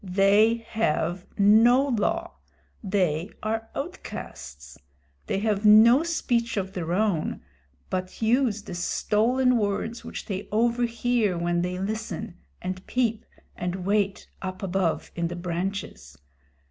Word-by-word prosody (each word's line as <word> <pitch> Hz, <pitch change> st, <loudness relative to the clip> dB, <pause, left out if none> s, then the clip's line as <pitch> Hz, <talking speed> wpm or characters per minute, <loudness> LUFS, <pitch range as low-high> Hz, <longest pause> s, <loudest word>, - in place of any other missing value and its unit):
They 200 Hz, +4 st, +4 dB
have 180 Hz, -4 st, -1 dB
no 230 Hz, +7 st, +5 dB
law. 335 Hz, +9 st, -1 dB, 0.5 s
They 185 Hz, -3 st, 0 dB
are 225 Hz, +1 st, -2 dB
outcasts. 70 Hz, -, -7 dB, 0.5 s
They -, -, 0 dB
have 210 Hz, -1 st, 0 dB
no 220 Hz, +5 st, +7 dB
speech 240 Hz, -9 st, -1 dB
of 190 Hz, -1 st, -2 dB
their 170 Hz, -4 st, -3 dB
own, 190 Hz, -, 0 dB, 0.5 s
but 185 Hz, 0 st, -3 dB
use 225 Hz, -2 st, +1 dB
the 185 Hz, -, -8 dB
stolen 235 Hz, +8 st, +1 dB
words 210 Hz, +3 st, -2 dB
which -, -, -7 dB
they 195 Hz, -2 st, -4 dB
overhear 235 Hz, -2 st, +1 dB
when 175 Hz, 0 st, 0 dB
they 180 Hz, +1 st, -2 dB
listen, 215 Hz, 0 st, -4 dB, 0.2 s
and 185 Hz, +1 st, -4 dB
peep, 230 Hz, -3 st, 0 dB, 0.3 s
and 180 Hz, +1 st, -4 dB
wait 200 Hz, -1 st, 0 dB
up 185 Hz, +1 st, -5 dB
above 185 Hz, -3 st, -1 dB
in 170 Hz, -1 st, -1 dB
the 175 Hz, -, -5 dB
branches. 175 Hz, -, -4 dB
205 Hz, 120 wpm, -26 LUFS, 180-230 Hz, 0.5 s, no